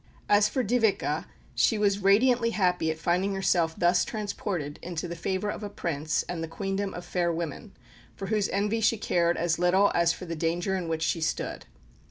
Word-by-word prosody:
As 205 0 +4
for 260 - -1
Dyveke, 205 - +1 0.3
she 220 - +2
was 200 -1 +2
radiantly 230 +5 +4
happy 180 -4 +2
at 160 - -2
finding 180 +4 0
herself 170 -4 +1
thus 175 0 +3
transported 200 -8 -4
into 175 0 -4
the 170 - -5
favour 190 +4 -2
of - - -7
a 205 - -5
Prince 155 -5 -2
and 170 -2 -5
the - - -3
Queendom 195 +3 -3
of 175 - -7
fair 175 -1 0
women, 170 +5 -5 0.4
for 195 - -6
whose 210 0 0
envy 210 +3 0
she 225 +1 +3
cared 175 -4 +1
as 165 -1 0
little 185 +3 +4
as 170 0 +3
for 175 - -7
the 165 -1 -4
danger 170 +4 -1
in 180 -3 -3
which 160 -1 -2
she 165 - 0
stood. 160 - -3
180 Hz, 195 wpm, -27 LUFS, 170-205 Hz, 0.4 s, As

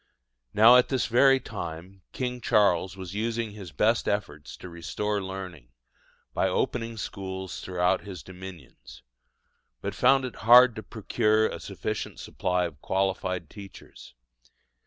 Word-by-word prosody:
Now 115 +4 +7
at 125 - +3
this 130 -2 0
very 135 +3 +5
time 95 -4 -8
King 125 -1 -4
Charles 100 -4 +2
was 95 -1 -7
using 115 +1 -2
his 100 -5 -10
best 110 +9 +1
efforts 80 -8 -3
to - - -10
restore 90 +5 -3
learning, 95 -8 -7 0.7
by - - +1
opening 115 +3 -2
schools 95 -2 -6
throughout 90 -1 0
his 95 -7 -9
dominions, 90 -5 -12 0.8
but - - -4
found 135 +1 +3
it 125 - -7
hard 120 +1 +7
to - - -4
procure 110 0 +1
a - - -3
sufficient - - -5
supply 90 0 -1
of 75 -4 -8
qualified 95 -2 -1
teachers. 100 - -13
100 Hz, 135 wpm, -27 LUFS, 90-115 Hz, 0.8 s, Now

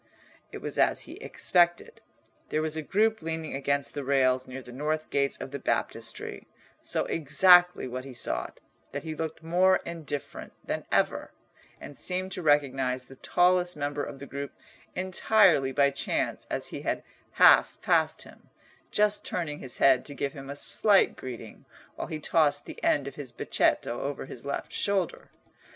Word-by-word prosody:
It - - -9
was - - -2
as - - +3
he - - -9
expected. 175 -1 0 0.5
There 155 - 0
was 155 -1 -1
a 160 - -2
group 215 +7 +1
leaning 160 -1 -4
against 140 0 0
the 145 - -4
rails 130 -1 +2
near 130 +1 -8
the 125 - -11
north 155 +4 -3
gates 140 -1 +1
of - - -7
the 140 - -5
Baptistery, - - -3 0.3
so - - -1
exactly 175 +3 +5
what 130 +1 -5
he 135 - -9
sought, - - -3 0.3
that 145 - -4
he 160 -1 -4
looked 160 0 -5
more 180 +3 +4
indifferent 155 -4 -6
than - - -3
ever, - - +1 0.5
and 145 - -10
seemed 185 +3 -1
to 185 - -4
recognise 135 -4 +1
the 135 - -14
tallest 180 +1 +2
member 145 0 -2
of 135 - -7
the 140 - -9
group 140 +1 -6 0.4
entirely 185 -5 +3
by 140 +1 +3
chance 140 - -2
as - - -2
he - - -6
had - - -2 0.3
half - - +6
passed - - +2
him, - - -17 0.4
just 210 0 +2
turning 150 -5 -3
his 125 - -8
head 130 -2 +5
to 145 - -6
give 140 0 -2
him 135 -1 -9
a 140 - -5
slight 200 +7 +4
greeting, 120 -4 -9 0.3
while - - -5
he 155 - -4
tossed 145 -2 +2
the - - -10
end 140 -2 +2
of 140 - -6
his 140 -3 -8
becchetto 120 0 0
over 140 -1 -4
his 130 -1 -9
left 140 - -4
shoulder. 195 -4 -1
145 Hz, 170 wpm, -28 LUFS, 135-175 Hz, 0.5 s, half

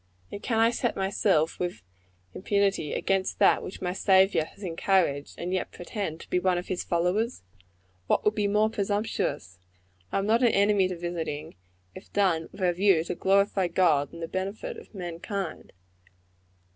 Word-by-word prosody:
And 200 - -6
can 230 - -1
I 225 +1 +4
set 240 0 -1
myself, 190 -4 +1
with 175 - -3 0.5
impunity, 200 -5 0
against 195 -1 0
that - - +4
which 185 - -8
my 180 0 -1
Saviour 190 -4 +4
has 200 - -15
encouraged, 165 -5 0
and 180 +2 -3
yet 185 - -1
pretend 175 -3 -5
to - - -13
be 180 - +3
one 180 -1 +1
of 175 - -5
his 185 - -2
followers? 180 - 0 0.6
What - - +1
would 210 - +4
be 210 -2 0
more 210 +2 +3
presumptuous? 205 - -2 0.5
I - - 0
am 195 - 0
not 225 +3 +3
an 245 - +5
enemy 200 -1 +3
to 185 -1 -5
visiting, 165 -3 -4 0.4
if - - -13
done 180 -5 +1
with - - -12
a 175 -1 +3
view 185 -2 +3
to 170 - -3
glorify 195 +1 +2
God 165 -5 +2
in 170 - -10
the 165 - -3
benefit 195 - -4
of 455 - -13
mankind. 180 +1 -5
190 Hz, 170 wpm, -27 LUFS, 170-205 Hz, 0.6 s, an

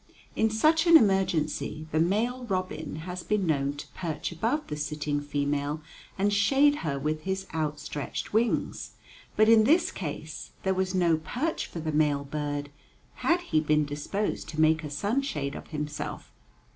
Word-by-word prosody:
In 220 - +3
such 310 +10 +3
an 335 -1 +10
emergency 170 - +1
the 155 - +1
male 225 +9 +1
robin 185 -7 -3
has 180 0 -5
been 210 -1 0
known 140 -3 +1
to 145 - -8
perch 160 -3 -4
above 230 - -1
the 150 - -5
sitting 150 0 -2
female 145 +1 -1 0.4
and 200 +1 +2
shade 275 +8 +4
her 140 - -2
with 155 +2 -2
his 190 +3 -2
outstretched 150 -2 -3
wings. 225 +2 0 0.4
But 215 - +5
in 225 -1 +7
this 325 +9 +4
case 155 -2 -6
there 190 - +2
was 190 0 -1
no 170 -3 +3
perch 250 - -2
for 170 - -7
the 155 0 -2
male 150 -2 +2
bird, 145 0 -3 0.5
had 345 +1 +2
he 250 - +1
been 150 -1 +2
disposed 145 +9 -3
to 155 - -5
make 160 0 +4
a 150 - -5
sunshade 160 - -1
of - - -8
himself. 150 -1 -5
160 Hz, 160 wpm, -28 LUFS, 150-210 Hz, 0.5 s, an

